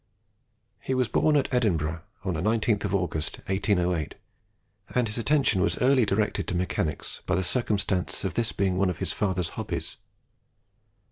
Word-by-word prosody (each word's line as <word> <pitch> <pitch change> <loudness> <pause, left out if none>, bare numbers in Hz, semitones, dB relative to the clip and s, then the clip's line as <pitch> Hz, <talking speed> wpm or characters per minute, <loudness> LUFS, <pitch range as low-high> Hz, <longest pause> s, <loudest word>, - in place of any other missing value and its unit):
He 130 - -2
was 130 -2 +2
born 155 +5 +2
at 135 - 0
Edinburgh, 85 -9 +1 0.2
on 95 - 0
the 80 - -2
19th 110 +1 +1
of 100 0 0
August, 85 -4 -2
1808; 90 -4 0 0.8
and 125 -2 +3
his 105 +2 -2
attention 130 -6 +2
was 100 - +1
early 130 -3 +4
directed 105 -1 0
to - - -1
mechanics 85 -3 -2
by - - +2
the 95 - +1
circumstance 100 -4 0
of 95 - -2
this 115 -1 0
being 95 -2 0
one 95 0 +2
of 90 - -3
his - - -2
father's 95 -4 0
hobbies. - - -5
100 Hz, 160 wpm, -27 LUFS, 90-115 Hz, 0.8 s, early